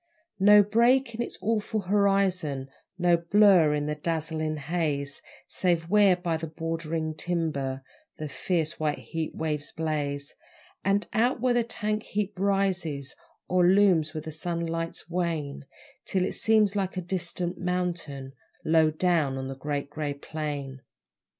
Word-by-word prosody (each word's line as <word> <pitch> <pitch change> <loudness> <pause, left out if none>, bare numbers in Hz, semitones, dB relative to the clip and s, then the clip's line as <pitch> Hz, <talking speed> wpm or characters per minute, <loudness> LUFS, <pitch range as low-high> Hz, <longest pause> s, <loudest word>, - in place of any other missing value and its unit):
No 205 +1 +8
break 235 +4 +3
in 225 - -3
its 240 - -4
awful 215 0 0
horizon, 185 -8 +1 0.3
No 175 -1 +4
blur 170 -3 +5
in 145 0 -1
the 150 - -1
dazzling 155 0 -2
haze, 145 -2 -2 0.2
Save 170 -2 0
where 205 -2 +5
by 175 -2 -2
the 165 +1 -5
bordering 165 0 -3
timber 155 -6 -2 0.3
The 155 - -4
fierce, 155 +4 -2
white 150 -1 0
heat 160 -1 -5
waves 150 -2 -2
blaze, 145 -3 -3 0.5
And 200 +1 +2
out 240 +3 +2
where 250 +1 +2
the 240 -1 +2
tank 215 -2 -2
heap 205 -2 -3
rises 185 -8 0 0.3
Or 180 0 +3
looms 175 -4 +4
when 155 - -4
the 160 - -6
sunlights 165 0 -3
wane, 165 -6 -3 0.4
Till 185 -2 +1
it - - -2
seems 215 -2 +3
like 190 -2 -1
a - - 0
distant 175 0 -2
mountain 175 -7 -3 0.3
Low 160 -1 +4
down 155 -4 +1
on 130 0 -4
the 135 - -5
Great 145 +1 -4
Grey 150 -1 -3
Plain. 140 -3 -5
165 Hz, 145 wpm, -27 LUFS, 150-195 Hz, 0.5 s, No